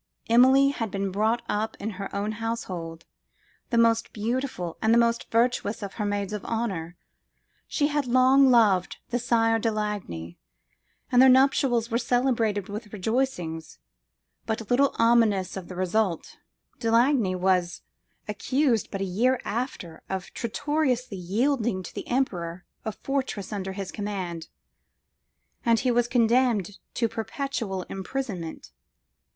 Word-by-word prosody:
Emilie 260 +3 +6
had 230 -6 -3
been 195 0 -2
brought 220 +4 +1
up 215 +2 -2
in 215 +2 -3
her 195 0 -6
own 205 +2 -1
household, 185 -8 -5 0.6
the 235 - 0
most 230 0 +3
beautiful 225 -6 -3
and 220 - +3
the 230 - +6
most 235 0 +1
virtuous 230 -2 +1
of 195 - -6
her 210 - -3
maids 205 0 -2
of 210 - -4
honour. 185 -7 -3 0.7
She 290 - 0
had 295 -2 0
long 260 +2 +5
loved 210 -7 +3
the 245 - +1
Sire 225 -1 +2
de 225 - +1
Lagny, 200 - -4 0.7
and 250 0 +6
their 265 - +8
nuptials 255 -3 +3
were 230 - +2
celebrated 235 -5 +1
with 210 +1 -7
rejoicings 185 -7 -2 0.7
but 220 -1 -3
little 275 +3 +3
ominous 225 -5 +3
of 190 -2 -6
the 185 - -8
result. 185 -1 -1 0.4
De 230 - -1
Lagny 230 -4 +3
was 180 -1 0 0.4
accused 245 +3 0
but 195 - -4
a - - 0
year 240 +8 +1
after 205 -8 -4
of 190 -1 -5
traitorously 250 -2 -1
yielding 215 +2 0
to - - -9
the - - -6
emperor 180 -9 -2 0.2
a 220 - -1
fortress 260 -5 -3
under 190 -2 -4
his 195 -1 -5
command, 185 -5 -4 1.2
and 230 -2 +3
he 250 0 +2
was 240 0 +2
condemned 235 -4 +2 0.2
to 230 - +1
perpetual 225 -3 -3
imprisonment. 190 - -5
225 Hz, 140 wpm, -26 LUFS, 190-245 Hz, 1.2 s, their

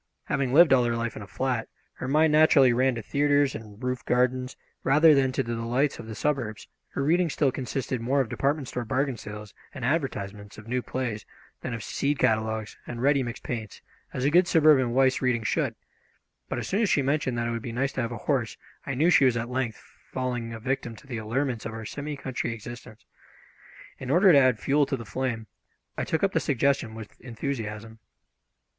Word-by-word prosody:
Having 140 -2 -1
lived 160 -2 +7
all 125 -2 +5
her 120 -1 0
life 115 0 -3
in - - -7
a 100 - -9
flat, 125 -2 -2 0.2
her 125 - -6
mind 155 +3 +4
naturally 145 -5 +6
ran 130 +1 +2
to 115 - -5
theatres 145 +1 +2
and 110 0 -10
roof 125 -1 -2
gardens, 125 +1 0 0.3
rather 155 +4 +6
than 135 -2 +3
to 135 - -1
the 120 0 -4
delights 120 +5 0
of 110 - -8
the 110 - -6
suburbs, 125 -4 -2
and - - -28
her 140 - 0
reading 170 +4 +2
still 140 -2 +1
consisted 130 -1 -3
more 130 +4 +1
of 130 - +1
department 140 +4 -1
store 125 - -3
bargain 130 +3 0
sales 105 -1 -9 0.2
and 130 -4 -4
advertisements 105 -9 -2
of 110 0 -12
new 125 +2 -1
plays 120 -5 -3 0.4
than 125 - -4
of 115 - -7
seed 145 +6 -1
catalogues 110 -1 0
and 120 0 -5
ready 140 0 +4
mixed 120 -2 -5
paints, 110 -4 -6 0.3
as 130 - -2
a 145 - +3
good 175 +2 +5
suburban 150 -7 +5
wife's 130 +1 +3
reading 125 -3 +1
should; - - 0 0.7
but - - -2
as - - -3
soon 200 - 0
as 215 - +2
she 140 - +3
mentioned 135 -3 0
that 120 - -1
it 120 - -1
would 115 0 -3
be 120 - -5
nice 135 +4 -1
to - - -1
have 115 0 -2
a 120 - -4
horse 130 -6 0 0.3
I 140 - -2
knew 160 +7 +3
she 140 - +6
was 125 -2 +3
at 115 +1 -3
length 125 -4 -2 0.3
falling 125 -3 -3
a 115 - -6
victim 120 -1 -3
to 140 - -16
the 125 -4 -5
allurements 115 +2 -2
of 115 - -7
our 110 0 -7
semi 145 +5 -5
country 130 -4 -3
existence. 115 0 -11 0.9
In 130 - -6
order 180 +6 +6
to 145 - +7
add 130 -3 +4
fuel 140 +6 +2
to 135 - -1
the 115 - -8
flame 115 +1 -3 0.5
I - - -2
took 160 - -1
up 195 - +3
the 165 - +1
suggestion 135 -5 0
with 110 -2 -11
enthusiasm. 115 -3 -5
130 Hz, 215 wpm, -26 LUFS, 115-140 Hz, 0.9 s, lived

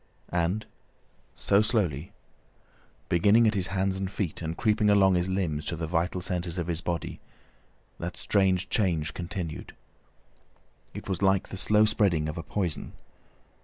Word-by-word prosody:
And 90 +5 0 0.7
so, 100 +1 +3
slowly, 90 - 0 1.0
beginning 100 +7 +4
at 110 - +3
his 95 -3 0
hands 95 0 0
and 95 -1 -2
feet 95 -4 -3
and 80 0 -4
creeping 105 -1 +2
along 100 -2 +5
his 90 +1 +1
limbs 85 -6 -1
to 85 - -1
the 80 0 -3
vital 85 +2 -1
centres 90 -1 -3
of 85 - -1
his 85 0 -2
body, 85 -1 -3 0.8
that 85 +1 -5
strange 95 -2 +2
change 80 -7 +1
continued. 85 -3 -5 1.2
It - - -7
was 95 -2 -2
like 95 -1 +2
the - - -6
slow 105 +2 +4
spreading 100 -8 +2
of 75 - -4
a 85 - -4
poison. 85 0 -3
90 Hz, 150 wpm, -28 LUFS, 85-100 Hz, 1.2 s, along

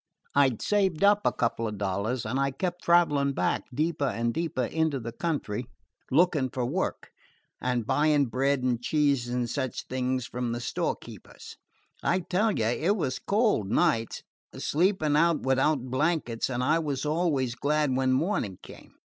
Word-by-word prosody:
"I 140 -1 +5
'd 120 - -6
saved 195 -5 +1
up 205 +1 +4
a - - +4
couple 115 -1 -1
of 105 -1 -5
dollars, 100 +5 -2
and 125 +5 -1
I 140 0 +2
kept 175 +6 -4
traveling 145 -5 +3
back, - - 0
deeper 150 +2 -1
and 115 -1 -1
deeper 160 -6 -1
into 160 +1 0
the 115 -1 -6
country, 125 -5 -3 0.4
looking 150 -3 +3
for 125 0 -2
work, 170 +10 -3 0.5
and 125 -3 -1
buying 150 +1 +3
bread 135 +2 0
and 120 -2 0
cheese 140 -2 +1
and 120 0 -1
such 130 0 -3
things 130 -1 -2
from 125 -1 -3
the 120 - -3
storekeepers. 120 - -5 0.5
I 185 +2 +1
tell 200 +6 +1
you, 115 - -1
it 155 - +1
was 130 -8 -2
cold, 205 - +1
nights, 115 +1 +1 0.3
sleeping 160 -2 +1
out 165 +1 +3
without 135 +1 +2
blankets, 135 -5 0
and 125 -1 -2
I 155 +5 +3
was 145 -3 -3
always 150 -6 0
glad 145 +2 0
when 130 0 +1
morning 130 - 0
came. - - -14
140 Hz, 165 wpm, -27 LUFS, 125-160 Hz, 0.5 s, I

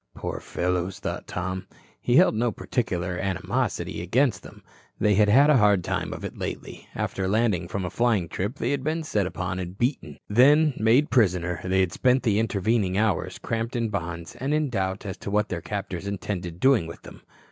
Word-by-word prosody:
Poor - - -4
fellows, 90 +1 -2
thought 105 - -5
Tom, 95 +1 -4 0.4
who - - +3
held - - +6
no 115 +2 +1
particular 90 -7 -2
animosity 95 -3 -2
against 120 +8 +1
them, - - -14 0.4
they 105 - +3
had 105 +1 +4
had 135 +7 +6
a 145 - +6
hard 105 -5 +4
time - - -2
of - - -6
it - - -6
lately. - - -6
After 95 -1 -2
landing 100 -4 +1
from 95 +1 -3
a 90 - -4
flying 115 -7 +1
trip, 100 - -3
they - - -1
had 140 -2 -1
been 160 +3 -1
set 105 -11 0
upon 95 0 -4
and 90 +1 -6
beaten. 120 - -2
Then, 145 +7 +5
made 115 +7 +3
prisoner, 90 -7 +2
they 95 +1 +2
had 90 -2 +1
spent 130 0 +2
the 105 -3 +2
intervening 105 -2 0
hours 110 -1 0
cramped 115 +2 -3
in 115 -2 0
bonds 85 -4 -5
and 140 +4 -1
in 150 -3 0
doubt 95 -2 -2
as 100 -1 -5
to - - -6
what 105 +1 +1
their 90 -2 -3
captors 100 -1 -5
intended 90 -3 -4
doing 130 -9 +4
with 85 - -10
them. - - -12
100 Hz, 195 wpm, -25 LUFS, 90-120 Hz, 0.4 s, held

